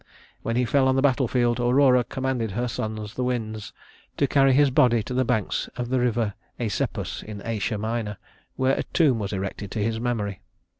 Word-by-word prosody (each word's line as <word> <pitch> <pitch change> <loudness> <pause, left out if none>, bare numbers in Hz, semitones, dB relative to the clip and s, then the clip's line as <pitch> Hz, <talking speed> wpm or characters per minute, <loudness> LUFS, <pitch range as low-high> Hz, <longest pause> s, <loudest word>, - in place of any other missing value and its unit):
When 115 - -2
he 125 +1 +2
fell 130 +3 +3
on 130 - +3
the 135 - +2
battle 130 -2 +3
field, 120 0 +1
Aurora 125 +1 +4
commanded 130 -3 -2
her 120 +4 -1
sons, 110 -2 -4
the 125 - -2
winds, 110 -4 -3 0.5
to 140 - +3
carry 135 0 +4
his 140 +1 +4
body 120 -3 +4
to 125 - -5
the 130 +1 +2
banks 110 -5 -1
of 120 -1 -3
the 130 0 +1
river 120 -4 +1 0.3
Æsepus 110 -5 -2
in 105 -1 -7
Asia 110 -1 -1
Minor, 110 -1 -3 0.4
where 130 +1 +2
a - - -1
tomb 145 -9 +2
was 100 -2 -3
erected 100 0 -4
to 105 0 -2
his 110 +1 -1
memory. 105 -5 -2
120 Hz, 195 wpm, -25 LUFS, 110-130 Hz, 0.5 s, Aurora